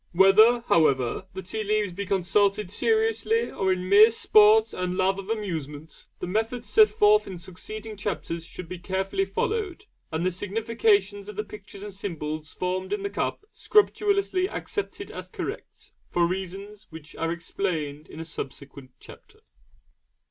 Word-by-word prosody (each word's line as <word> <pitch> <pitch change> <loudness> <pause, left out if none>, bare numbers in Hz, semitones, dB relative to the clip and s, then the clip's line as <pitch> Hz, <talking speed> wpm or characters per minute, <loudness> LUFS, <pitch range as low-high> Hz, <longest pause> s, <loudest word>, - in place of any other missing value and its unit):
Whether, 215 +6 +6
however, 155 - +2
the 190 - -5
tea 215 +4 -3
leaves 210 -1 0
be 200 +3 -5
consulted 195 +1 +1
seriously 450 - +1
or 190 -1 0
in 185 0 -1
mere 205 +3 +8
sport 220 0 +5
and 180 0 -2
love 190 +1 +2
of 195 +1 -8
amusement, 160 -8 -5
the - - -5
methods 225 +6 -2
set 435 0 +6
forth 425 0 +4
in 185 - -6
succeeding 210 +5 -8
chapters 185 -4 -4
should 170 +1 -9
be 180 +1 -7
carefully 195 +1 -1
followed, 405 - -2 0.3
and 160 +2 -1
the 185 - +2
significations 205 0 0
of 210 - -8
the 210 - -2
pictures 200 -1 -11
and 205 -1 -7
symbols 155 -5 -5
formed 185 +1 -3
in 415 -1 -2
the 400 - -3
cup - - -3
scrupulously 400 -2 +2
accepted 410 -1 -5
as - - -8
correct, - - -7 0.2
for 175 -1 +2
reasons 195 +3 -5
which 160 -2 -12
are 165 0 -1
explained 165 -4 -3
in 155 - -11
a 165 - -5
subsequent 140 -3 -8
chapter. 430 0 -16
195 Hz, 155 wpm, -26 LUFS, 175-220 Hz, 0.3 s, mere